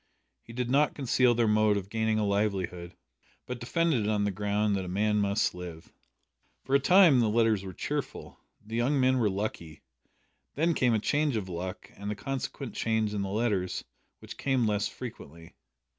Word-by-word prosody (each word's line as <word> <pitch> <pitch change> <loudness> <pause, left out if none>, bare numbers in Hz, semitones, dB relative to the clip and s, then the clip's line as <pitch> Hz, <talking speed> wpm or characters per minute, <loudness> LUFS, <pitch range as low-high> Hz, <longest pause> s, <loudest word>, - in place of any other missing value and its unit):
He - - -13
did 125 +1 -3
not 145 +2 +3
conceal 125 -2 +2
their 115 -1 +2
mode 105 -1 +3
of 100 0 -6
gaining 110 -1 0
a 105 - +1
livelihood, 95 -4 -1 0.5
but 125 -1 -5
defended 150 0 +1
it - - +1
on 105 -1 +1
the 100 - 0
ground 105 +1 0
that 95 - -2
"a - - -7
man 105 +3 +1
must 100 0 +1
live!" 90 -2 -9 0.7
For 135 - -4
a 140 - +6
time 170 -2 +6
the 115 -2 +2
letters 110 -2 +2
were 95 - -6
cheerful. - - -5 0.3
The 110 +2 -6
young 135 +4 +1
men 130 0 +3
were 110 -3 +2
"lucky." 95 -6 -5 0.7
Then 165 +4 +2
came 125 -6 +2
a - - +2
change 145 +4 0
of 100 -4 -3
luck, 90 +2 -6
and 100 +1 -5
a - - -3
consequent 135 +1 -5
change 110 -2 0
in 105 - -2
the 100 - -3
letters, 100 -4 -1 0.4
which - - -10
came 130 -3 +1
less 105 -1 0
frequently. 85 - -10
110 Hz, 190 wpm, -29 LUFS, 100-125 Hz, 0.7 s, a